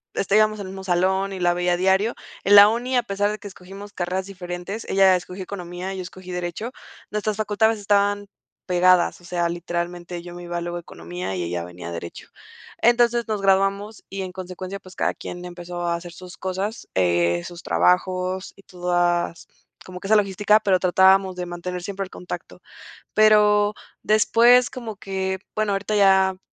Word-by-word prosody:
este, 200 +1 0
íbamos 215 0 +3
al 200 - -5
mismo 190 0 -8
salón 190 +2 +1
y 190 - -6
la 175 0 +3
veía 175 0 +1
diario. 190 +5 +2 0.3
En 200 +2 +5
la 205 0 +11
uni, 245 +3 -1
a - - +4
pesar 205 -1 0
de 215 - -5
que 205 - -9
escogimos 195 +2 -11
carreras 185 +1 -2
diferentes, 180 +2 -6
ella 190 -1 +5
escogió 180 +1 -6
economía 180 0 -6
y - - -6
yo - - -4
escogí 185 0 -10
derecho, 180 +7 -4 0.4
nuestras 210 0 -2
facultades 215 +1 +1
estaban 205 0 +1 0.4
pegadas, 180 -1 +3
o - - -21
sea, 175 -1 -1
literalmente 175 0 -4
yo 175 0 -10
me 175 - -9
iba 175 0 -4
luego 175 0 -4
a 175 - -4
economía 90 - -6
y 90 - -2
ella 85 0 -3
venía 90 0 -9
a - - -5
derecho. 85 0 -8 0.5
Entonces, 235 0 +3
nos 210 -2 -1
graduamos 195 +2 +1
y, 195 0 -4
en 185 -1 -7
consecuencia, 185 +1 -7
pues, 185 -1 -14
cada - - +1
quien 175 0 -8
empezó 175 0 -7
a 170 - +1
hacer 170 +1 -8
sus 180 +1 -11
cosas, 195 +4 -4
eh, 85 -1 +2
sus 175 0 -9
trabajos 185 +1 +1
y 195 - -17
todas 175 -2 -1 0.4
como 180 0 -9
que - - -6
esa 215 - +6
logística, 205 +1 +3
pero 195 -4 +2
tratábamos 190 +1 +4
de 180 - -3
mantener 175 +1 -5
siempre 195 +1 -4
el 190 - -9
contacto. 180 - -8 0.5
Pero 210 -1 +5 0.3
después 235 +3 +5
como 230 -4 -7
que, 190 -1 -3 0.2
bueno, 215 -1 0
ahorita 195 +2 -2
ya 190 -1 +4
190 Hz, 185 wpm, -23 LUFS, 175-205 Hz, 0.5 s, la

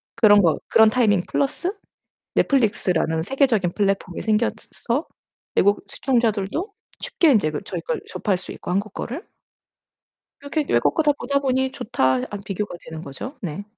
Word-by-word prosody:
그런 205 -3 +6
거 160 -4 +3
그런 220 -1 +6
타이밍 215 -6 +3
플러스 300 +7 -1 0.6
넷플릭스라는 180 - +2
세계적인 225 - +1
플랫폼이 195 -3 -1
생겼 220 +1 +1 0.2
서 260 +7 -2 0.5
외국 205 +1 +3
시청자들도 235 - 0 0.3
쉽게 325 -4 +2
인제 195 -10 +3
그 150 - -4
저희 - - -4
걸 - - -3
접할 195 -4 -1
수 - - -10
있고 - - -6
한국 200 +2 -1
거를 285 - -5 1.2
이렇게 295 +2 -1
외국 120 - +3
거 320 - +2
다 295 -1 +4
보다 280 0 -1
보니 265 -1 0
'좋다.' 130 - 0
하고 205 -1 -6
비교가 200 -1 -4
되는 160 0 -8
거죠. 245 - -7
네. 180 +3 -5
215 Hz, 325 characters per minute, -22 LUFS, 185-270 Hz, 1.2 s, 그런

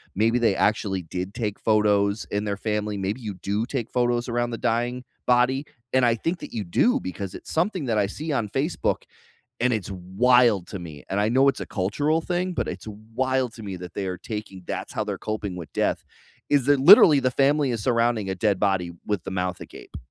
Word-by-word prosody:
maybe 115 +4 +2
they 115 -5 +3
actually 100 -3 0
did 90 +4 -5
take 105 -4 -3
photos 105 -1 +2
in 105 +1 -1
their 100 -1 -2
family. 105 0 -2
Maybe 100 +6 -3
you 105 -3 -5
do 100 +4 -2
take 125 -4 -4
photos 120 0 +1
around 120 0 0
the 115 - -3
dying 120 +2 -1 0.2
body, 125 +3 +3 0.3
and 130 -1 +4
I 115 -1 +3
think 165 +9 -2
that - - -9
you 110 - -2
do 100 - +2
because 95 0 -6
it's - - -9
something 175 -1 0
that 115 -3 0
I 100 - +2
see 150 +10 -5
on 110 -6 -1
Facebook, 140 - -1 0.6
and 125 +1 +2
it's 105 -4 -2
wild 100 +2 +3
to 100 - -6
me, 80 -4 -9
and 100 - 0
I 105 - +2
know 130 +4 +4
it's 140 - 0
a - - -4
cultural 145 - 0
thing, 180 +2 -1
but - - -2
it's 90 +3 -6 0.3
wild 130 -1 0
to 115 - -10
me 100 -2 -5
that 90 -1 -9
they 100 -2 -3
are 90 - -3
taking 105 -4 -7
that's - - -5
how - - 0
they're - - -4
coping 105 -4 -4
with 85 -3 -8
death, - - 0 0.4
is 140 -3 +2
that 145 -1 +4
literally 155 -2 +9
the 130 -1 +1
family 140 +1 +2
is 115 -3 -3
surrounding 115 -4 +1
a 95 - -1
dead 100 0 +1
body 95 -4 +1
with 105 -5 -2
the - - -5
mouth 90 -1 -2
agape. - - -11
110 Hz, 220 wpm, -24 LUFS, 100-125 Hz, 0.6 s, literally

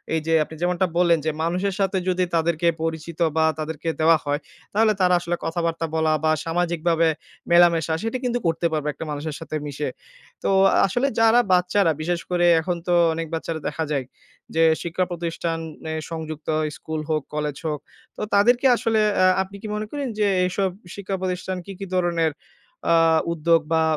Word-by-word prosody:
এই 160 - +2
যে, 165 - +2
আপনি 160 - -11
যেমনটা 180 +1 +1
বললেন 170 -2 +4
যে, 160 - +1
মানুষের 180 +4 0
সাথে 195 -1 +1
যদি 185 0 +1
তাদেরকে 165 +1 +1 0.2
পরিচিত 165 +1 -4 0.2
বা 160 - +4
তাদেরকে 155 +1 -3
দেওয়া 160 0 +5
হয়, 145 +1 0 0.3
তাহলে 215 +1 +4
তারা 180 0 +4
আসলে 175 0 -2
কথাবার্তা 165 0 -1
বলা 160 -1 +2
বা 155 - +3
সামাজিকভাবে 170 -1 +1 0.4
মেলামেশা, 170 -2 +5
সেটি 225 +3 -1
কিন্তু 245 -1 0
করতে 165 +1 0
পারবে 155 -2 -2
একটা 160 - -7
মানুষের 150 +1 -4
সাথে 160 -1 -6
মিশে। 145 +1 -3 0.6
তো - - +2 0.4
আসলে 245 +8 0
যারা 225 +1 +6
বাচ্চারা, 180 0 +3
বিশেষ 175 +1 -1
করে 175 -1 +2 0.2
এখন 180 +2 -2
তো 175 - +2 0.2
অনেক 165 0 -4
বাচ্চারা 165 0 -3
দেখা 155 +2 -2
যায় 140 -3 -1 0.5
যে, 165 - +4 0.2
শিক্ষা 170 +2 -1
প্রতিষ্ঠানে 165 -2 -4 0.2
সংযুক্ত 155 -1 -6 0.3
স্কুল 160 -1 -4
হোক, 155 -1 +1
কলেজ 150 -2 -2
হোক। 150 -2 -2 0.4
তো - - -6
তাদেরকে 240 +6 +4
আসলে 225 -1 +1 0.2
অ্যা 185 - +4 0.2
আপনি 195 +1 -13
কি - - -6
মনে 215 - -3
করেন 285 -2 -3
যে, 210 - +3 0.2
এইসব 190 +1 0 0.3
শিক্ষা 200 -1 -4
প্রতিষ্ঠান 185 0 -3
কি, - - -8
কি 195 - -4
ধরনের 170 -3 +1 0.6
আ - - +6 0.4
উদ্যোগ 165 0 +3
বা 160 0 +3
170 Hz, 175 wpm, -23 LUFS, 160-185 Hz, 0.6 s, যারা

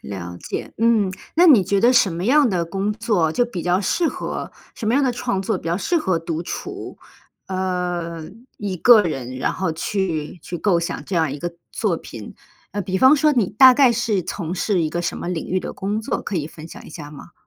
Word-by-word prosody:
了 90 -3 -7
解， - - -6
嗯， 225 -4 +3 0.2
那 345 +2 +5
你 265 - +7
觉 195 +2 +1
得 240 +4 +5
什 235 -6 +4
么 170 +2 -4
样 280 +4 +4
的 180 -5 0
工 195 +4 -2
作 210 -7 0
就 245 +10 +2
比 195 -8 -6
较 180 +1 +1
适 325 - +1
合 - - -5 0.2
什 225 - -6
么 225 - +2
样 280 +1 +3
的 255 - +1
创 195 -5 -2
作 - - -1
比 - - -16
较 170 - +1
适 340 - 0
合 185 - 0
独 165 0 -4
处？ - - -7 0.5
呃， 180 -3 -2 0.3
一 200 -3 -4
个 225 +4 +7
人， 130 -7 -4
然 130 - -1
后 185 -2 -2
去 165 -2 -3
去 175 - -5
构 175 -1 +2
想 170 - -4
这 195 - -5
样 160 -4 +2
一 145 - -6
个 175 +3 -4 0.2
作 - - -1
品。 - - -10 0.4
呃， 205 - -2
比 190 0 -2
方 260 +8 +6
说 305 +1 +3
你 235 -9 +1
大 255 +5 +7
概 260 -2 +5
是 225 -5 0
从 175 -1 -4
事 190 0 0
一 155 - 0
个 175 +2 -3
什 170 - -3
么 - - -5
领 175 -3 -3
域 185 +1 0
的 - - -6
工 205 +3 -2
作， 220 - -3
可 195 - -4
以 150 -3 -2
分 155 0 -11
享 - - -11
一 - - -11
下 145 -3 -9
吗？ 150 +3 -12
185 Hz, 245 characters per minute, -21 LUFS, 170-225 Hz, 0.5 s, 你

